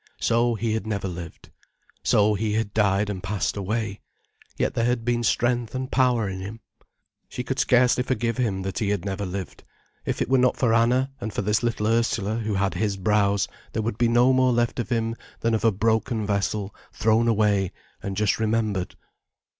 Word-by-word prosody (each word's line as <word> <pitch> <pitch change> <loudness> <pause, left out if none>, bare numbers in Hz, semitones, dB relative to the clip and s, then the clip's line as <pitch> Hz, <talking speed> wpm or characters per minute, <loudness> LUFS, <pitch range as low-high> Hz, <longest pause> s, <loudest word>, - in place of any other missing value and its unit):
So, 120 +1 +2
he 110 +1 -1
had 110 -1 -3
never 100 -2 -2
lived. 85 -2 -8 0.5
So, 105 0 +3
he 105 +1 -1
had 110 -1 -1
died 100 -1 +2
and 100 -3 -4
passed 100 +1 -2
away. 105 +1 -3 0.6
Yet - - 0
there 115 - 0
had 120 -2 0
been 120 -1 +1
strength 120 +1 0
and 130 0 -4
power 125 -4 +2
in 95 -1 -4
him. 100 +4 -7 0.7
She 125 - -4
could 130 +2 -3
scarcely 125 -2 +4
forgive 120 -2 -1
him 100 -7 -1
that 95 -1 -3
he 105 - 0
had 100 -2 -1
never 100 0 -3
lived. 95 +1 -6 0.4
If - - -2
it - - 0
were 130 +1 +3
not 125 0 +3
for 120 -3 +2
Anna, 125 +4 +3
and 110 - -3
for - - -2
this 105 +2 +1
little 115 -3 -1
Ursula, 115 -1 +1
who 110 -2 -2
had 95 -2 0
his 100 +2 -1
brows, 100 0 +2 0.3
there 110 - -1
would 110 -1 -3
be 120 - +4
no 120 +3 +4
more 130 0 +4
left 120 0 0
of 120 - -3
him 115 -1 0 0.3
than 115 0 +1
of 110 - 0
a 115 - +5
broken 110 +2 0
vessel 100 0 -1 0.2
thrown 110 +2 +2
away, 105 -4 +2 0.3
and 95 -1 -4
just 105 -1 +1
remembered. 110 -4 -1
110 Hz, 195 wpm, -24 LUFS, 100-120 Hz, 0.7 s, a